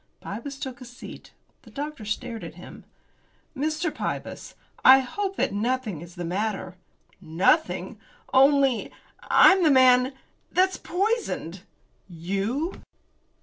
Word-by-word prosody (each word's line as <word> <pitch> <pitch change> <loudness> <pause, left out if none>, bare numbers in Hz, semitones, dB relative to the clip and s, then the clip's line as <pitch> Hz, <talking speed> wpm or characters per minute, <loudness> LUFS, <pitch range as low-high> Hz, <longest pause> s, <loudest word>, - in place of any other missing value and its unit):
Pybus 270 +7 -7
took 260 -1 -7
a - - -8
seat. 245 +1 -11 0.3
The - - -17
doctor 295 -5 -6
stared 225 +2 -4
at - - -9
him. - - -12 0.7
"Mr. 310 +3 -2
Pybus, - - -5 0.3
I 260 +1 +9
hope 390 +9 -4
that - - -1
nothing 220 -5 -2
is 175 +1 -12
the 175 -1 -5
matter." 190 0 -3 0.5
"Nothing, 185 - +1 0.3
only 275 -2 +4 0.3
I'm 385 -1 +6
the 325 - +4
man 255 -1 +5 0.4
that's 375 +1 +2
poisoned." 375 - -2 0.5
"You!" 200 - -3
255 Hz, 115 wpm, -25 LUFS, 200-300 Hz, 0.7 s, I